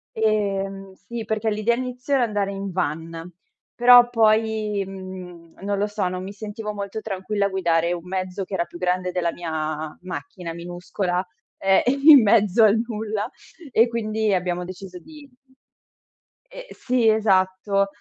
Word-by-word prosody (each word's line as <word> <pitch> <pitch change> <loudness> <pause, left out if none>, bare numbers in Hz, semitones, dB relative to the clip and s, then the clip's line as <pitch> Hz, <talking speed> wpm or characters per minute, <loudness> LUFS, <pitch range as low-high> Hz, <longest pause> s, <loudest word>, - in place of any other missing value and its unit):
Ehm, 195 -3 -1
sì, 230 +3 -7
perché 220 0 -1
l'idea 215 +2 +1
inizio 250 +2 -4
era 260 -3 +4
andare 205 -3 -1
in 195 -1 -5
van, 165 0 -4 0.4
però 245 0 +7
poi, 215 -2 +2
mhmm, 185 -3 -10
non 200 0 -2
lo 205 - +1
so, 205 -3 -2
non 180 0 -4
mi 195 +2 -6
sentivo 210 +1 -6
molto 200 +1 -5
tranquilla 200 0 -2
a - - -5
guidare 170 -2 +1
un 175 0 -7
mezzo 185 +1 -3
che 195 - -11
era 170 -2 0
più 175 - -12
grande 180 0 -1
della 175 -2 0
mia 155 -2 -4
macchina 185 -2 -7
minuscola, 175 +2 -3 0.3
ehm, 195 0 +3 0.3
in 290 -5 +11
mezzo 210 0 +4
al 215 +1 +5
nulla 215 -1 -3 0.4
e 230 +2 +5
quindi 220 -2 -1
abbiamo 180 0 -2
deciso 185 0 -9
di 300 - -14 1.2
ehm, - - -9
sì, 245 -3 0
esatto. 195 -1 +2
195 Hz, 150 wpm, -23 LUFS, 180-220 Hz, 1.2 s, in